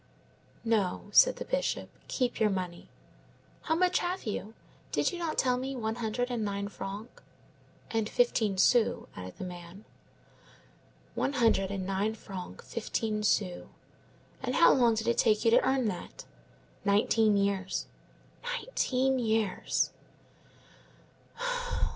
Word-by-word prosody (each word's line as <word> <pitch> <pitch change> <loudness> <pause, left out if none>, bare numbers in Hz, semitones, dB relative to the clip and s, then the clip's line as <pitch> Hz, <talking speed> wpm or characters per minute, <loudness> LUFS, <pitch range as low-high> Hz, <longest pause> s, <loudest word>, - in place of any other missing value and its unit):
"No," 205 -4 0
said - - +7
the - - -6
Bishop; - - -1 0.2
"keep 250 -2 -1
your 215 -1 +4
money. 180 -3 -4 0.7
How 320 - 0
much 360 +1 +3
have 360 +2 -2
you? 215 0 -4 0.4
Did - - +1
you 355 - -5
not 330 -2 -2
tell 250 -1 +3
me 265 +2 -3
one 220 -2 -2
hundred 240 +2 -2
and 235 -3 -1
nine 200 0 -2
francs?" 200 +4 -7 0.7
"And 225 -1 0
fifteen 220 -5 +2
sous," 230 +4 +3
added 90 0 -8
the - - -6
man. 180 +2 -9 1.3
"One 280 - -1
hundred 225 -7 +3
and 195 -2 -3
nine 195 +3 0
francs 190 -4 -9
fifteen 215 -1 -1
sous. 195 -3 0 0.7
And - - -2
how - - +7
long 235 -3 +4
did 220 +1 -2
it 235 - +2
take 215 +1 +3
you 230 - +5
to - - +6
earn 265 -3 +2
that?" 180 - -7 0.6
"Nineteen 210 +1 +3
years." 200 -1 0 0.6
"Nineteen 270 - 0
years!" 220 -4 +1
220 Hz, 130 wpm, -30 LUFS, 200-250 Hz, 1.3 s, said